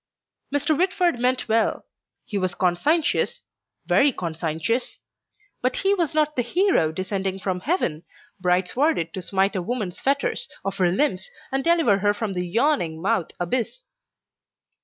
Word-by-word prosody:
Mr. 290 +2 +1
Whitford 360 -5 +1
meant 255 +1 +1
well; 225 0 +1 0.4
he 210 - -7
was 185 -1 0
conscientious, 295 - +1 0.4
very 285 0 +4
conscientious. 165 +5 -2 0.6
But 255 +1 0
he 390 +1 +2
was 335 -5 -1
not 305 -1 +2
the 250 - +2
hero 295 - +2
descending 190 +2 -2
from 190 -2 -2
heaven 180 - -1 0.4
bright 180 0 +2
sworded 255 - +1
to 190 - -4
smite 195 +3 +1
a 185 - 0
woman's 200 -2 -3
fetters 280 - 0 0.2
of 195 0 -2
her 180 -2 +3
limbs 190 -3 0 0.2
and 270 0 0
deliver 325 -12 +3
her 205 +1 +2
from 205 -1 -3
the 180 -1 -2
yawning 220 - +1
mouth 195 0 0
abyss. 240 - -2
220 Hz, 145 wpm, -24 LUFS, 185-290 Hz, 0.6 s, very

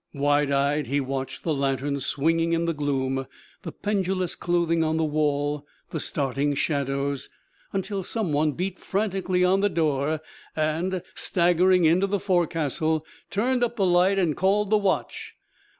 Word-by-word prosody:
Wide 145 0 +2
eyed, 140 +1 +1
he 140 +3 +1
watched 135 0 -4
the 160 - 0
lantern 140 0 -1
swinging 165 +5 +1
in 165 0 +1
the 165 - 0
gloom, 135 -3 -1 0.3
the - - -6
pendulous 190 -3 -1
clothing 170 -1 +1
on 160 0 0
the 160 - +1
wall, 145 -1 0 0.3
the 160 - -3
starting 140 0 -1
shadows, 140 -1 -1 0.4
until 195 0 -2
some 190 -3 -2
one 150 +1 +2
beat 185 +3 -3
frantically 190 -3 0
on 190 +2 +3
the 205 +1 +2
door, 155 -3 0 0.4
and, 165 +4 -1
staggering 180 0 +3
into 175 +5 +4
the 200 0 0
forecastle, 160 -3 0 0.2
turned 245 +5 +1
up 240 0 0
the 200 -4 +1
light 180 +2 +4
and 170 -6 +1
called 200 +2 +1
the - - +6
watch. 195 -2 -2
165 Hz, 150 wpm, -25 LUFS, 145-185 Hz, 0.4 s, the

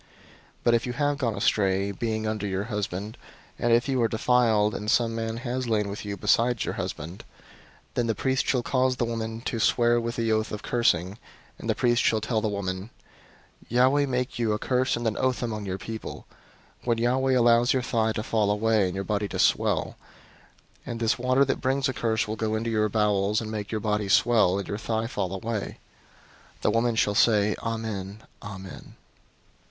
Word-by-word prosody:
005:020 - - -30 0.6
But 120 - +4
if 120 +1 +1
you 125 - -3
have 145 +2 0
gone 115 -5 0
astray, 100 -1 +1
being 110 +2 -2
under 110 -1 -2
your 95 0 -2
husband, 105 +1 -4 0.4
and 120 - +1
if 120 +3 +3
you 130 -2 +1
are 115 - +4
defiled, 110 -2 +2
and 105 +2 -4
some 115 0 +2
man 115 0 -3
has 125 0 -3
lain 105 -2 +1
with 100 +1 -6
you 100 -1 -4
besides 120 +4 +2
your - - -2
husband:' 80 +5 -5 0.7
005:021 - - -37
then 120 - 0
the 115 - 0
priest 130 +5 0
shall 125 -3 +1
cause 130 0 +1
the 120 - 0
woman 115 -1 -4
to 115 -1 -3
swear 120 +1 +3
with 115 +1 -3
the 115 -1 0
oath 110 0 0
of 105 - -5
cursing, 100 -5 +1 0.4
and - - -6
the - - +2
priest 120 0 +2
shall 110 - +2
tell 110 0 -1
the 110 - 0
woman, 95 0 -4 0.8
'Yahweh 130 +4 +3
make 125 -1 -2
you 110 -2 +1
a - - 0
curse 125 +3 +1
and 120 - -4
an 110 -2 0
oath 130 -1 0
among 110 -3 -3
your 95 0 -2
people, 110 +3 -7 0.6
when 120 -2 +1
Yahweh 130 +3 +2
allows 120 0 +4
your 130 -2 +1
thigh 110 -3 +1
to 110 - -3
fall 110 -3 +1
away, 105 0 +2
and 90 - -5
your 95 - -2
body 105 0 -1
to - - -5
swell; - - +1 0.9
005:022 - - -4
and 115 - -5
this 115 +1 +1
water 130 +2 +3
that 135 - -2
brings 135 +1 +1
a 130 - -2
curse 110 -3 0
will 110 - -3
go 110 0 -1
into 115 +1 -2
your 105 -1 +1
bowels, 105 -1 +1
and 110 -1 -5
make 105 -2 -5
your 110 - -1
body 105 -1 -1
swell, 110 -3 +4
and 100 - -4
your 100 - -4
thigh 110 0 -1
fall 100 -6 -3
away.' 105 +2 -4 0.8
The - - +2
woman 115 +1 +1
shall 105 -2 +2
say, 105 -1 +3
'Amen, 110 -3 -4 0.2
Amen.' 95 -2 -9
110 Hz, 205 wpm, -26 LUFS, 105-120 Hz, 0.9 s, But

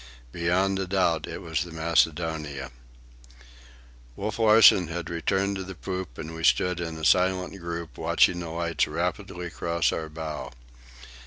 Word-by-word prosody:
Beyond 95 +4 +1
a 95 - -2
doubt 85 -5 +1
it - - -7
was 80 -2 -1
the 85 - -10
Macedonia. 80 -4 0 1.4
Wolf 105 +2 -4
Larsen 110 -5 +7
had 85 0 -5
returned 95 +4 0
to 95 - -4
the 95 0 -8
poop, 90 -6 -5
and 80 +1 -7
we 80 0 -7
stood 90 +1 +3
in 80 -2 -4
a 80 - -4
silent 90 +4 +2
group, 85 -1 -6
watching 85 +2 +3
the 85 -2 -5
lights 85 0 0
rapidly 90 0 -3
cross 85 0 0
our 80 -1 -4
bow. 80 -1 -6
85 Hz, 150 wpm, -26 LUFS, 80-95 Hz, 1.4 s, Larsen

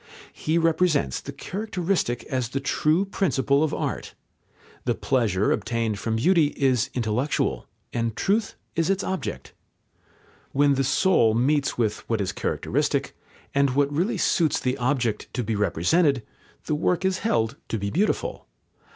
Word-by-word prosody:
He 155 +2 -1
represents 165 - +2
the - - -7
characteristic 185 - -2
as 130 -4 -2
the 135 - -2
true 155 +6 +1
principle 140 -7 +1
of 155 - 0
art. - - -3 0.7
The - - +1
pleasure 110 -7 +1
obtained 110 -1 -1
from 110 -1 -1
beauty 160 +6 +4
is 130 -5 +2
intellectual, 125 +4 -1 0.3
and 115 -2 -1
truth 205 +2 0 0.2
is 165 +1 +1
its 195 0 +1
object. 190 -1 -4 1.0
When 145 +1 +4
the 135 0 +1
soul 135 - +3
meets 140 +4 +1
with 110 -3 0
what 115 -2 +1
is 95 -2 -1
characteristic, - - -1 0.4
and 140 -2 +2
what 145 0 +2
really 180 +10 0
suits 160 -4 +2
the 125 0 0
object 120 -3 -1
to 125 - -1
be 110 0 -1
represented, 110 - +2 0.4
the - - -1
work 170 +4 +1
is 190 0 +1
held 115 - 0
to 115 - -2
be 100 -1 -3
beautiful. 205 +6 -1
135 Hz, 145 wpm, -25 LUFS, 115-165 Hz, 1.0 s, beauty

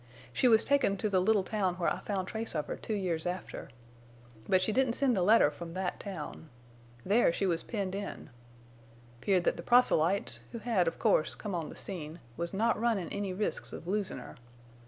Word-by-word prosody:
She 255 - +3
was 225 -2 +6
taken 280 -8 +2
to 215 - 0
the 190 -2 +3
little 200 +1 +3
town 190 -3 -1
where 180 -2 +1
I 175 - -5
found 190 -1 -3
trace 220 -3 -3
of 150 - -1
her - - -4
two 220 - -4
years 175 -5 -1
after. 180 0 -5 0.8
But 185 - +5
she 185 +4 +1
didn't 260 +1 +2
send 260 -1 +2
the 190 - +1
letter 195 -5 +5
from 165 +3 -8
that 185 -1 -2
town. 165 -5 -7 0.6
There 210 -1 +4
she 195 - -1
was 170 -3 +1
penned 200 -5 -3
in. 200 -6 -6 0.9
'Peared 185 +1 +2
that - - +1
the - - -5
proselytes, 200 -5 +3
who - - -3
had, 220 -6 +1
of 165 - -1
course, 155 - +2
come 205 -3 -5
on 165 -3 -3
the - - -9
scene, 165 -4 -6 0.2
was 170 +1 -3
not 215 +3 +1
runnin' 225 -7 +1
any 200 -1 -3
risks 200 +3 -2
of - - -8
losin' 200 -3 -1
her. 125 - -10
195 Hz, 200 wpm, -31 LUFS, 175-215 Hz, 0.9 s, was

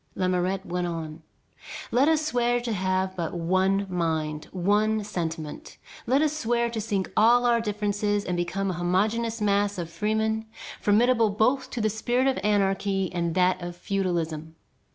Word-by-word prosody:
Lamourette 185 +1 0
went 180 -1 -2
on: 160 -2 -5 0.7
"Let 255 +5 +4
us 310 -1 +2
swear 245 -4 +1
to 235 -2 -2
have 185 -1 -1
but 170 -1 -3
one 190 +3 +1
mind, 160 -4 -2
one 210 +4 +1
sentiment. 165 -6 -5 0.3
Let 270 +5 +3
us 305 -1 0
swear 235 -4 0
to 225 -2 -3
sink 200 -3 -2
all 240 +3 +5
our 235 -1 +3
differences 205 -1 -1
and 180 - -1
become 185 +3 -1
a 175 - -5
homogeneous 215 +6 0
mass 205 0 +1
of 170 -2 -5
freemen 220 +2 -1 0.3
formidable 230 +2 +3
both 235 +6 +1
to 240 - -4
the 215 - +2
spirit 240 +4 0
of 270 -1 +1
anarchy 195 -2 +1
and 170 -1 -1
that 185 0 +2
of 175 0 -6
feudalism. 170 -4 -2
200 Hz, 155 wpm, -26 LUFS, 180-225 Hz, 0.7 s, all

